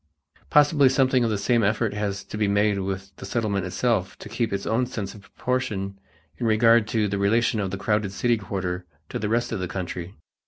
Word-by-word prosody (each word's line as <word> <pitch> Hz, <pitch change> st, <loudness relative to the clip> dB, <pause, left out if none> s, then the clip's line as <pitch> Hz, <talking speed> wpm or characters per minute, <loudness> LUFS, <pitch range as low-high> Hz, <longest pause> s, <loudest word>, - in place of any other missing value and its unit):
Possibly 145 Hz, -2 st, +5 dB
something 130 Hz, -1 st, +3 dB
of 115 Hz, -, +1 dB
the 105 Hz, -, 0 dB
same 115 Hz, +4 st, +2 dB
effort 110 Hz, +1 st, +1 dB
has 100 Hz, -1 st, -2 dB
to -, -, -8 dB
be 105 Hz, -1 st, +1 dB
made 100 Hz, 0 st, +2 dB
within 95 Hz, 0 st, -3 dB
the -, -, -8 dB
Settlement 100 Hz, -4 st, -1 dB
itself 105 Hz, -1 st, 0 dB
to -, -, -10 dB
keep 115 Hz, +2 st, -1 dB
its 100 Hz, 0 st, -2 dB
own 120 Hz, +3 st, +1 dB
sense 105 Hz, -6 st, -5 dB
of 105 Hz, -, -12 dB
proportion 100 Hz, -4 st, -3 dB, 0.4 s
in 120 Hz, -, 0 dB
regard 115 Hz, 0 st, +5 dB
to 110 Hz, -2 st, +1 dB
the 100 Hz, 0 st, -2 dB
relation 110 Hz, +2 st, +2 dB
of 100 Hz, -2 st, -1 dB
the 100 Hz, -, -4 dB
crowded 105 Hz, -1 st, 0 dB
city 120 Hz, +4 st, +1 dB
quarter 95 Hz, -3 st, -4 dB, 0.2 s
to -, -, -4 dB
the 105 Hz, -, -2 dB
rest 120 Hz, +2 st, 0 dB
of 115 Hz, -, -2 dB
the 90 Hz, -, -2 dB
country. 90 Hz, 0 st, -5 dB
105 Hz, 210 wpm, -25 LUFS, 100-115 Hz, 0.4 s, Possibly